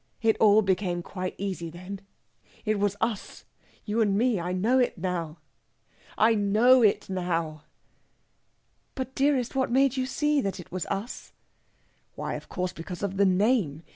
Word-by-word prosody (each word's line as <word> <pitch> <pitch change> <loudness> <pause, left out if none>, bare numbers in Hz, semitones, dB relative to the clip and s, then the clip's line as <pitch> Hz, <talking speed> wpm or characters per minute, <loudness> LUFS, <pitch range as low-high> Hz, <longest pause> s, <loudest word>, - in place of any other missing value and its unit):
It 225 -1 +4
all 215 0 +6
became 185 -2 0
quite 185 0 -5
easy 185 -4 -4
then. 185 +4 -8 0.6
It 215 -1 +1
was 205 0 +1
us 225 -3 -3 0.4
you 220 +2 0
and 200 -2 +2
me! 235 -3 +2
I 175 +1 -3
know 220 +8 +2
it 245 - +1
now 170 -3 -3 0.8
I 225 +1 +5
know 220 +5 +4
it 210 -3 +3
now!" 165 -5 -2 1.3
"But, 260 0 -4
dearest, 270 -3 +1
what 265 -1 +1
made 270 +1 +3
you 255 0 0
see 295 +2 +1
that 195 -4 -3
it 175 - -11
was 185 0 -4
us?" 210 +6 -5 0.8
"Why, - - -4
of - - -7
course, 180 -1 -3
because 175 +3 -7
of 195 -1 -2
the 200 0 +4
name! 185 - +1
200 Hz, 160 wpm, -27 LUFS, 180-235 Hz, 1.3 s, all